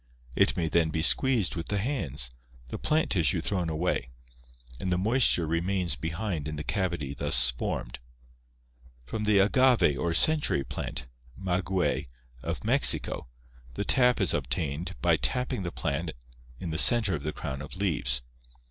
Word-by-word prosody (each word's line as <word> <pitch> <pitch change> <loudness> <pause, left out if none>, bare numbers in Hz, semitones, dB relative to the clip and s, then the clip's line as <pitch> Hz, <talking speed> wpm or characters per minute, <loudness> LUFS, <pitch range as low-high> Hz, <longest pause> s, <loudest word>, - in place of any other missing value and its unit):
It - - +2
may 85 -2 0
then 80 0 +2
be 80 0 -2
squeezed 115 - +3
with 85 - -5
the 105 - -1
hands, 80 - -1 0.4
the - - -6
plant 155 +1 0
tissue 80 - +2
thrown 90 -4 -2
away, 80 -5 -2 0.7
and 90 - -3
the 90 - +2
moisture 110 -3 +4
remains 85 +1 0
behind 80 -1 -4
in 75 - -5
the 75 - -5
cavity 85 -9 -2
thus 65 -4 +4
formed. - - -5 1.1
From 105 - -4
the 105 -1 +3
agave 100 - +3
or 85 +2 -1
"century 150 - +3
plant" 65 0 -6 0.3
(maguey) 95 -2 -1 0.3
of - - -4
Mexico - - +2 0.5
the 100 - -3
sap 125 -2 +3
is 95 -5 +3
obtained 70 +4 -3
by - - +4
tapping 125 -3 -1
the 85 -2 -4
plant 80 -1 -3 0.5
in 85 - -5
the 80 - 0
center 115 -5 +5
of 75 - -3
the 75 - -3
crown 65 -1 -6
of 75 - -9
leaves. 75 -11 0
85 Hz, 155 wpm, -28 LUFS, 75-100 Hz, 1.1 s, center